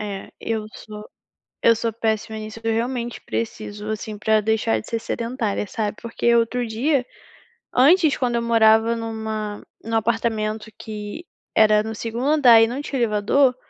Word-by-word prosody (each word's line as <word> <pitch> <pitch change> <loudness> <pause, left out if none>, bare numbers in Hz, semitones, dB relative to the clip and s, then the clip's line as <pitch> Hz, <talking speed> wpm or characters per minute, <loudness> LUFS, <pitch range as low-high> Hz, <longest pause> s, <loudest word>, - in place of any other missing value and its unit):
Eh, 200 -2 -6
eu 220 -2 -2
sou 210 -1 -10 0.5
eu 230 - +6
sou 230 +1 -2
péssima 220 -1 -2
nisso, 215 +1 -8
eu 225 - 0
realmente 240 +1 -2
preciso 215 -2 -5
assim 215 0 -4
para 215 +1 +2
deixar 220 +1 +1
de - - -14
ser 230 - -2
sedentária, 230 -3 -2
sabe? 210 +1 -3
Porque 235 0 0
outro 240 +2 +1
dia 250 +4 0 0.7
antes, 310 +4 +5
quando 245 -2 0
eu 235 - +1
morava 225 0 +4
numa 220 -2 -4 0.2
num 225 +1 -3
apartamento 220 -1 -1
que 210 +8 -7 0.3
era 215 -1 +5
no 220 0 -5
segundo 230 +3 -4
andar 270 -7 +7
e 225 - +5
não 250 +5 -4
tinha 275 -3 -4
elevador, 235 +4 +3
225 Hz, 160 wpm, -22 LUFS, 215-235 Hz, 0.7 s, andar